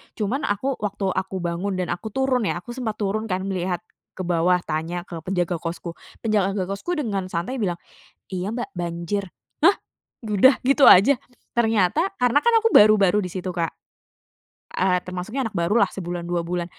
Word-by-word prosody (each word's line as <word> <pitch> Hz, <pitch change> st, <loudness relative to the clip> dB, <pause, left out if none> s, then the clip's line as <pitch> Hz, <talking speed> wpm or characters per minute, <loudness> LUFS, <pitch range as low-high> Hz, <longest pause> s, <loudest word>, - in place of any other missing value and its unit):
Cuman 230 Hz, +7 st, -2 dB
aku 255 Hz, +6 st, -1 dB
waktu 200 Hz, -2 st, -2 dB
aku 190 Hz, +1 st, -3 dB
bangun 175 Hz, +3 st, -2 dB
dan 180 Hz, -2 st, -2 dB
aku 175 Hz, +5 st, -4 dB
turun 260 Hz, -4 st, +1 dB
ya, -, -, 0 dB
aku 240 Hz, -, -8 dB
sempat 240 Hz, -4 st, -3 dB
turun 215 Hz, +2 st, -2 dB
kan, 185 Hz, -1 st, -2 dB
melihat 180 Hz, -2 st, -2 dB, 0.3 s
ke 185 Hz, -, -4 dB
bawah, 175 Hz, +1 st, +2 dB
tanya 165 Hz, +3 st, -3 dB
ke 170 Hz, -2 st, -8 dB
penjaga 175 Hz, -2 st, -1 dB
kosku. 170 Hz, 0 st, -5 dB, 0.3 s
Penjaga 200 Hz, -3 st, +1 dB
kosku 200 Hz, -, -3 dB
dengan 200 Hz, -10 st, -2 dB
santai 185 Hz, +10 st, -3 dB
bilang, 180 Hz, -5 st, 0 dB, 0.6 s
"Iya 185 Hz, +2 st, -3 dB
Mbak, 240 Hz, -, -5 dB
banjir." 175 Hz, +3 st, -3 dB, 0.3 s
Hah, 380 Hz, +5 st, +7 dB, 0.6 s
udah, 250 Hz, +6 st, +5 dB
gitu 275 Hz, +2 st, +4 dB
aja? 240 Hz, +9 st, +8 dB, 0.4 s
Ternyata, 225 Hz, -, +2 dB
karena 250 Hz, +3 st, +4 dB
kan 470 Hz, -, +4 dB
aku 455 Hz, -, +4 dB
baru-baru 210 Hz, -2 st, +6 dB
di 180 Hz, -, -4 dB
situ 185 Hz, 0 st, -4 dB
Kak, 170 Hz, -2 st, -1 dB, 1.0 s
eee, 180 Hz, -1 st, +2 dB
termasuk 180 Hz, +6 st, -6 dB
anak 230 Hz, -5 st, -2 dB
barulah, 195 Hz, +6 st, +3 dB
sebulan, 175 Hz, -2 st, -5 dB
2 175 Hz, 0 st, -1 dB
bulan. 175 Hz, 0 st, -3 dB
190 Hz, 170 wpm, -23 LUFS, 175-220 Hz, 1.0 s, aja